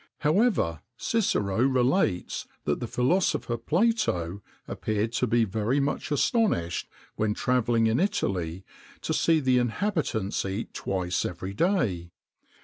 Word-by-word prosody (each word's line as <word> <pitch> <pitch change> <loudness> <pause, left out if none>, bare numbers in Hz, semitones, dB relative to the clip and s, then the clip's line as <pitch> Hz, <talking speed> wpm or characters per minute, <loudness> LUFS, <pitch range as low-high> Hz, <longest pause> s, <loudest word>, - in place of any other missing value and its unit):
However, 155 - +2 0.2
Cicero 115 - 0
relates 130 - +1 0.2
that - - -1
the - - -4
philosopher 125 -2 +1
Plato 115 - 0 0.3
appeared 110 +1 -2
to 125 - +1
be 115 +1 +3
very 110 +6 0
much 140 0 -1
astonished, 145 - +1 0.3
when 105 -1 0
travelling 120 -2 +2
in 110 +1 +2
Italy, 95 - -1 0.4
to - - -2
see 165 -1 +3
the 130 -3 +3
inhabitants 120 - -1
eat 95 +3 -4
twice 90 -2 -1
every 90 +2 -5
day. 105 - 0
115 Hz, 120 wpm, -27 LUFS, 95-155 Hz, 0.4 s, be